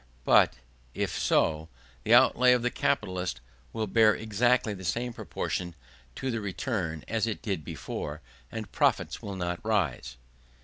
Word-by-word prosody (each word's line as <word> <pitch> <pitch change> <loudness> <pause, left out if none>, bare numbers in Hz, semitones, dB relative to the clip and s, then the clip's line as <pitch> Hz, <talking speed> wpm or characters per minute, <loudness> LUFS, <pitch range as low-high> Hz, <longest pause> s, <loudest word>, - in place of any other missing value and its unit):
But, - - +5 0.4
if - - -1
so, 80 0 +1 0.3
the - - -2
outlay 125 0 +6
of 125 -1 +1
the 125 - +1
capitalist 90 - -1 0.3
will 110 -1 -2
bear 110 +1 +4
exactly 110 +1 +1
the 95 -1 -9
same 120 +7 -2
proportion 90 -5 -4 0.4
to 130 - -2
the 115 -2 -2
return 95 - -3
as 115 0 0
it 110 - -4
did 95 -8 -2
before; 75 +2 -6 0.3
and 110 -3 -6
profits - - +1
will 100 -1 -6
not 90 -1 -3
rise. 90 - -1
100 Hz, 145 wpm, -28 LUFS, 90-115 Hz, 0.4 s, outlay